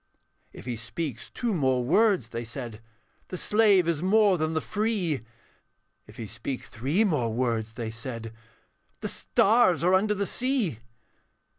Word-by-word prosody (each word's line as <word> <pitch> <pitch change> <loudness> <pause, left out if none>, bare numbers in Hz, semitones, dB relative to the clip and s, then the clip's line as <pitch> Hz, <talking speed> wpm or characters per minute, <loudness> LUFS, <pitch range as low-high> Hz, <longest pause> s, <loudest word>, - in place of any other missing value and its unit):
'If - - -12
he 120 -2 -3
speak 120 +2 -4
two 235 -3 -2
more 130 -7 +1
words,' 185 - +3
they 115 0 -4
said, 115 -2 -7 0.5
'The 185 - -5
slave 205 -3 +4
is 165 -3 0
more 205 +1 +4
than 155 +1 0
the - - +2
free; 200 - -1 0.8
If 105 - -15
he 115 - -5
speak 115 +5 -5
three 140 - 0
more 145 - +1
words,' 115 -2 -1
they 115 -1 -4
said, 115 -1 -6 0.7
'The - - -2
stars 195 - +3
are 180 +2 +4
under 210 +3 +3
the 200 0 -1
sea.' 245 - -1
155 Hz, 150 wpm, -27 LUFS, -, 0.8 s, slave